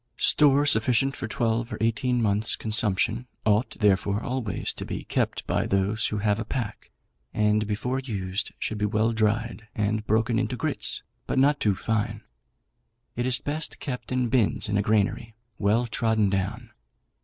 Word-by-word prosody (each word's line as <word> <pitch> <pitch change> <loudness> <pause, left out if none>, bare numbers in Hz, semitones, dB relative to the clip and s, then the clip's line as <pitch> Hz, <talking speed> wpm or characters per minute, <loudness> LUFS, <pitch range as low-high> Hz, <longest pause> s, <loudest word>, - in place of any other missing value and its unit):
Store 145 -1 +4
sufficient 130 +1 +2
for - - -5
twelve 115 0 -1
or - - -4
eighteen 115 +2 +1
months' 105 +1 +1
consumption 110 +2 +1 0.2
ought, 110 +4 +1
therefore, 100 0 +2
always 125 -4 -2
to - - -7
be - - -5
kept - - -1
by - - 0
those 100 +3 +1
who 105 - -2
have 105 0 +1
a - - -1
pack; 110 -2 -5 0.5
and 105 0 +2
before 125 +5 -1
used 100 -6 -3
should 110 - -3
be 105 - +1
well 110 +2 +1
dried, 110 0 -1
and 105 0 -1
broken 110 +2 +2
into - - -1
grits, - - -1 0.2
but - - -1
not 145 +2 +4
too 105 -3 +2
fine. 110 +1 -2 0.9
It 120 +1 -1
is 125 -2 +3
best 155 +2 -3
kept 125 -4 -5
in 125 -1 +1
bins 120 -5 +2
in 105 - -1
a 100 - +3
granary, 110 +2 0 0.2
well 110 +4 +2
trodden 110 -3 +1
down. 95 -1 -2
110 Hz, 165 wpm, -26 LUFS, 105-120 Hz, 0.9 s, Store